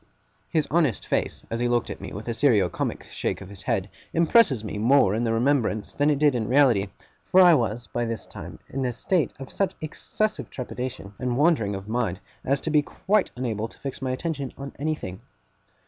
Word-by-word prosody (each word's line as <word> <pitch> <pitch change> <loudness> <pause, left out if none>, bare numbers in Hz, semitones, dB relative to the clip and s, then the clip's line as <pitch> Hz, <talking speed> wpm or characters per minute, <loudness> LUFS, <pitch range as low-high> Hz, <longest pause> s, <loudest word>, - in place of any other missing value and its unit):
His 155 -4 +1
honest 155 -8 +2
face, - - -1
as 115 - -1
he 120 - +1
looked 120 -1 +1
at - - -7
me - - -7
with 105 +4 -7
a 120 - 0
serio 110 -8 +3
comic - - -3
shake - - -2
of 95 - -10
his 100 -2 -9
head, - - 0 0.3
impresses 165 - +4
me 105 -1 -4
more 115 -3 +5
in 115 +2 0
the 115 - +1
remembrance 115 -3 +1
than 145 +1 +2
it 145 - +3
did 145 -1 +4
in 120 -3 -1
the - - -6
reality, 125 -7 +4 0.4
for 185 - +6
I 180 -2 +9
was 115 -4 0
by 120 +4 -2
this 115 -1 -4
time - - -9
in 135 0 -3
a 125 -1 -1
state 170 +6 +1
of 135 -2 -9
such 195 - 0
excessive 215 +7 -2
trepidation 125 -5 -5
and 125 -1 -1
wandering 140 -10 +3
of 95 +1 -7
mind, 110 -5 -1 0.2
as 140 +1 +1
to 160 - -2
be 150 -1 +5
quite 195 +7 0
unable 115 -3 -2
to - - -18
fix 135 -1 -6
my 130 - -1
attention 140 0 -3
on 140 0 -6
anything. 145 -12 -3
125 Hz, 210 wpm, -25 LUFS, 110-145 Hz, 0.4 s, I